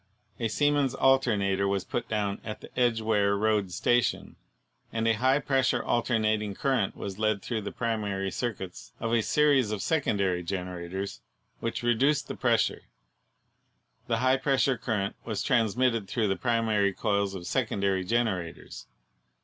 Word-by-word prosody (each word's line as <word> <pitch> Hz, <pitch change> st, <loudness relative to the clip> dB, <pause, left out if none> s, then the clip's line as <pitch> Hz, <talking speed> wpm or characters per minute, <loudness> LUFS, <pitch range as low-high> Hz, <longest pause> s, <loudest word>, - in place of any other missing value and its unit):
A 115 Hz, -, 0 dB
Siemens 145 Hz, +2 st, +1 dB
alternator 105 Hz, -8 st, +2 dB
was 100 Hz, -1 st, 0 dB
put 120 Hz, -, -4 dB
down 105 Hz, -2 st, -1 dB
at 105 Hz, -, -6 dB
the -, -, -12 dB
Edgeware 110 Hz, -4 st, +2 dB
Road 105 Hz, -3 st, +1 dB
Station, 120 Hz, +7 st, 0 dB, 0.6 s
and 115 Hz, 0 st, -1 dB
a 115 Hz, -, +4 dB
high 130 Hz, +5 st, +3 dB
pressure 135 Hz, -3 st, +1 dB
alternat 110 Hz, -3 st, +1 dB
ing 105 Hz, -2 st, -4 dB
current 130 Hz, -7 st, 0 dB
was 100 Hz, 0 st, -6 dB
led 110 Hz, -3 st, +1 dB
through 115 Hz, -3 st, -2 dB
the 100 Hz, -, -5 dB
primary 105 Hz, -5 st, -2 dB
circuits 100 Hz, -7 st, -5 dB
of 115 Hz, 0 st, -2 dB
a 115 Hz, -, +4 dB
series 140 Hz, -2 st, +3 dB
of 105 Hz, -2 st, -3 dB
secondary 100 Hz, -, +1 dB
generators 90 Hz, -3 st, -5 dB, 0.4 s
which 115 Hz, +1 st, -3 dB
reduced 130 Hz, +5 st, +2 dB
the -, -, -5 dB
pres -, -, +3 dB
sure. -, -, -2 dB, 1.3 s
The 115 Hz, -2 st, +1 dB
high 130 Hz, +2 st, +3 dB
pressure 135 Hz, -1 st, +2 dB
current 105 Hz, -5 st, -2 dB
was 110 Hz, -3 st, -3 dB
transmitted 115 Hz, -2 st, +1 dB
through 110 Hz, 0 st, 0 dB
the 95 Hz, -, +1 dB
primary 110 Hz, -1 st, +1 dB
coils 100 Hz, -1 st, 0 dB
of 90 Hz, -2 st, -7 dB
secondary 100 Hz, -4 st, 0 dB
generators. 90 Hz, -, -2 dB
110 Hz, 150 wpm, -28 LUFS, 100-120 Hz, 1.3 s, a